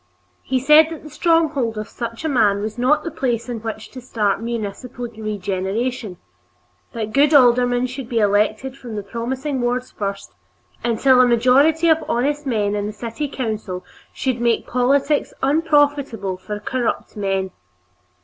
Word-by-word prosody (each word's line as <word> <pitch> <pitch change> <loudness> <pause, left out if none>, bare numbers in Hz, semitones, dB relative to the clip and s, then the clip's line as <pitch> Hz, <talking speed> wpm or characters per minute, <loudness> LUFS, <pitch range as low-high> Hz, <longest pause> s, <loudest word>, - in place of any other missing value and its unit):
He 260 0 -1
said 300 +4 +6
that 325 -2 -8
the 305 - -11
stronghold 310 -9 +1
of 215 0 -4
such 230 +5 -6
a - - +2
man 210 -8 +2
was 215 +2 -5
not 260 +5 +3
the 335 - -4
place 240 -3 -2
in 240 -2 -4
which 220 -1 -6
to 255 - -9
start 210 -4 -1
municipal 235 +2 -5
regeneration; 215 0 -3 0.8
that 215 -2 -4
good 290 +2 +4
aldermen 245 -1 +4
should 255 -1 -6
be 235 - -2
elected 215 +5 +1
from 240 -5 -8
the 205 - -4
promising 255 +6 -3
wards 245 +1 -1
first, 200 - -5 0.5
until 250 +2 +4
a 250 - +5
majority 270 +8 +4
of 320 -1 +3
honest 285 +4 0
men 210 -5 0
in 205 0 -2
the 210 - -5
city 230 +6 -4
council 215 -9 -4 0.3
should 255 -3 -2
make 235 -1 +1
politics 275 +4 +1
unprofitable 285 - +1
for 210 +3 -6
corrupt 240 +2 -2
men. 195 -2 -1
240 Hz, 155 wpm, -20 LUFS, 215-270 Hz, 0.8 s, said